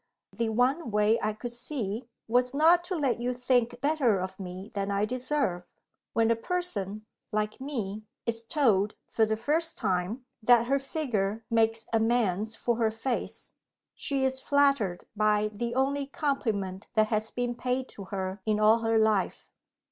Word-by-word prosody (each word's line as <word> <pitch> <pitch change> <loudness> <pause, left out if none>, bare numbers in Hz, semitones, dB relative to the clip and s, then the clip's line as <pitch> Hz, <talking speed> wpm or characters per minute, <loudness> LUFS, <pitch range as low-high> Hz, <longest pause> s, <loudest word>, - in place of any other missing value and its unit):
"The 230 -1 -1
one 250 +6 +1
way 210 +2 +3
I 215 0 0
could 240 +3 -6
see 240 -3 -3 0.2
was 250 +3 +2
not 335 +4 +5
to 370 +1 -2
let 275 -7 0
you 245 +1 -1
think 245 -1 +1
better 280 -7 +2
of 185 +2 -5
me 185 +2 -7
than 200 -1 -2
I 200 +1 +1
deserve. 255 -5 -1 0.5
When 225 0 +3
a - - +4
person, 220 - -3 0.3
like 215 +2 -2
me, 215 -7 -4 0.2
is 230 -1 -2
told, 225 - +2
for 220 -1 +2
the 220 0 0
first 315 +8 +1
time, 195 +5 -1 0.2
that 235 +1 +5
her 275 +3 +2
figure 225 -7 -2
makes 225 0 +2
amends 220 -2 +1
for 235 0 -1
her 225 -2 +2
face, 225 +3 -3 0.4
she 275 -2 -1
is 265 0 +2
flattered 275 -10 +2
by 210 0 +2
the 235 +3 -3
only 275 +1 +1
compliment 220 -10 -2
that 215 -1 +4
has 215 0 0
been 245 -1 -2
paid 255 +1 -2
to 200 - -9
her 190 0 -4
in 215 0 +1
all 215 +2 +5
her 225 0 +1
life. 220 -3 +1
230 Hz, 165 wpm, -28 LUFS, 210-260 Hz, 0.5 s, not